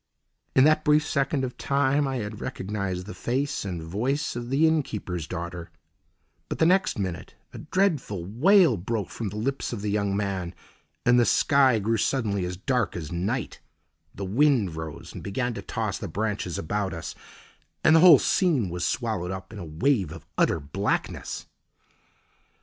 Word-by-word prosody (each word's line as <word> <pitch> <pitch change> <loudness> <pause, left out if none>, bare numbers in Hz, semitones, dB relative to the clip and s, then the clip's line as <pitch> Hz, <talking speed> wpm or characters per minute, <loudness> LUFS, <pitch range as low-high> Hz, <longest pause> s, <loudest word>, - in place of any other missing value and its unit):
In 130 - +7
that 155 +1 +4
brief 150 +1 +4
second 140 -1 0
of 125 -1 -5
time 140 +1 +2
I 135 - -2
had 105 -3 -5
recognised 95 -2 -3
the 105 - -7
face 135 +4 -2
and 90 -4 -4
voice 125 - -1
of 120 0 -5
the 145 +5 +4
inn 160 -1 +3
keeper's 90 - -5
daughter, 85 -1 -6 0.8
but - - -3
the 160 - +3
next 185 -2 +3
minute 95 -5 -4 0.2
a - - -8
dreadful 150 - 0
wail 155 - +4
broke 100 +1 -3
from 110 -3 -4
the 100 - -9
lips 135 +6 -2
of 110 -4 -5
the 105 - -1
young 100 -1 0
man, 95 -4 -3 0.5
and 125 0 +5
the - - +5
sky 135 -3 +4
grew 110 +2 0
suddenly 105 -6 0
as 90 0 -4
dark 125 +2 0
as 85 -3 -5
night, 100 +8 -2 0.6
the 100 - -4
wind 115 - +2
rose 80 -1 -7
and - - -8
began 120 +5 -2
to - - -6
toss - - -3
the - - -5
branches 105 -5 -2
about 95 +2 -2
us, 85 - -6 0.7
and 160 - +6
the - - +7
whole 170 -3 +9
scene 145 - +2
was 90 0 -3
swallowed 110 -7 -1
up 95 0 -6
in 105 - -7
a 90 - -6
wave 90 - +1
of 80 -1 -10
utter - - +2
blackness. 80 +8 -3
105 Hz, 175 wpm, -26 LUFS, 95-135 Hz, 0.8 s, whole